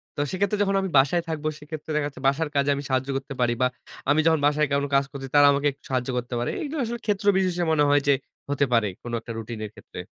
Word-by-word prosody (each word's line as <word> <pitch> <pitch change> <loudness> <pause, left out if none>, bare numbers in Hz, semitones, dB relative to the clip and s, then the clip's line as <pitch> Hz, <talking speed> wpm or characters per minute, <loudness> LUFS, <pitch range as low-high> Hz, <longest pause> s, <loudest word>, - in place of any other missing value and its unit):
তো - - -6
সেক্ষেত্রে 200 +2 0
যখন 195 -1 0
আমি 190 - -2
বাসায় 140 +6 +4
থাকব 155 -1 -4
সেক্ষেত্রে 150 +1 -9
দেখা 150 -1 +1
যাচ্ছে 140 -2 -10
বাসার 145 +3 +1
কাজে 140 0 +2
আমি 140 - -5
সাহায্য 130 +1 0
করতে 135 +1 -6
পারি। 120 -1 +3
বা 125 - +5 0.4
আমি 145 +2 +4
যখন 160 -1 +4
বাসায় 150 +1 +3
কোন 140 0 +1
কাজ 140 0 +4
করছি 135 -2 -7
তারা 145 0 +8
আমাকে 140 +1 +1
একটু 140 - -22
সাহায্য 130 -1 -1
করতে 125 0 -4
পারে। 120 - -1
এইগুলো 300 +1 -4
আসলে 235 0 -4
ক্ষেত্র 205 -1 -1
বিশেষে 180 -2 +1
মনে 150 -2 +3
হয় 145 0 +4
যে 140 - +6 0.4
হতে 145 0 +2
পারে। 115 -3 +3 0.2
কোন 120 - -6
একটা 115 - -9
রুটিনের 110 -1 -6
ক্ষেত্রে। - - -11
145 Hz, 245 wpm, -25 LUFS, 135-160 Hz, 0.4 s, তারা